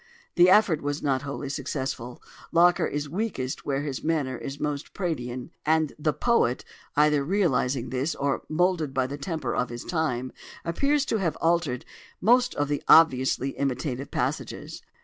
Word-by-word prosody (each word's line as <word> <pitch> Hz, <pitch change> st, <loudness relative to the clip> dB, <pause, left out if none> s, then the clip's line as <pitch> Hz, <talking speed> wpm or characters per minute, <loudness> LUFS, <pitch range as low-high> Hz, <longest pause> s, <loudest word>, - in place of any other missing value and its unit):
The 175 Hz, +1 st, +6 dB
effort 185 Hz, -6 st, +5 dB
was 145 Hz, +1 st, -3 dB
not 135 Hz, -2 st, +1 dB
wholly 140 Hz, 0 st, -5 dB
successful: 130 Hz, -3 st, -4 dB, 0.3 s
Locker 175 Hz, +1 st, +4 dB
is 145 Hz, 0 st, -3 dB
weakest 160 Hz, -, -3 dB
where 140 Hz, 0 st, 0 dB
his 140 Hz, -3 st, -4 dB
manner 150 Hz, -5 st, 0 dB
is 135 Hz, +3 st, -7 dB
most 145 Hz, -1 st, -4 dB
Praedian; 130 Hz, -7 st, -3 dB
and 155 Hz, -1 st, +2 dB
the 155 Hz, +1 st, +1 dB
poet, 150 Hz, -, +1 dB, 0.3 s
either 150 Hz, -1 st, +4 dB
realising 140 Hz, -, 0 dB
this, 135 Hz, +5 st, -1 dB
or 140 Hz, -1 st, -1 dB
moulded 160 Hz, -4 st, +1 dB
by 130 Hz, -1 st, +2 dB
the 140 Hz, +2 st, -6 dB
temper 155 Hz, -5 st, -3 dB
of 125 Hz, -, 0 dB
his 120 Hz, 0 st, -6 dB
time, 130 Hz, -7 st, -1 dB, 0.3 s
appears 280 Hz, -, +1 dB
to 225 Hz, -, 0 dB
have 180 Hz, -6 st, -1 dB
altered 165 Hz, -7 st, +1 dB, 0.3 s
most 245 Hz, +4 st, +3 dB
of 145 Hz, -, 0 dB
the 145 Hz, 0 st, -1 dB
obviously 135 Hz, -4 st, +5 dB
imitative 135 Hz, 0 st, -3 dB
passages. -, -, -3 dB
145 Hz, 155 wpm, -26 LUFS, 130-170 Hz, 0.3 s, The